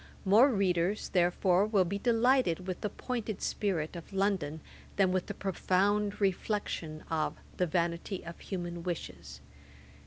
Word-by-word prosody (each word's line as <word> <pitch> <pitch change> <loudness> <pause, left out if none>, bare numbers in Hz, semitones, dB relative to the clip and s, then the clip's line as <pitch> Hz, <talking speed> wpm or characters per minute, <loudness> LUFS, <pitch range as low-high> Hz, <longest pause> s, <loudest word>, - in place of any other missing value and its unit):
More 220 +8 +7
readers, 195 -3 +1
therefore, 180 +2 +3
will 200 -4 +3
be 200 +3 -3
delighted 235 -6 +2
with 185 -1 -4
the 210 - -1
pointed 225 -2 -4
spirit 180 -6 -1
of 170 +2 -9
London, 190 -6 0 0.4
than 190 -2 +3
with 185 -1 0
the 205 - -5
profound 200 +2 +1
reflection 190 -5 -1
of 155 -1 0 0.2
The 180 - +1
Vanity 170 +2 -1
of 170 0 -8
Human 175 -3 -5
Wishes. 175 -1 -6
190 Hz, 135 wpm, -31 LUFS, 175-205 Hz, 0.4 s, More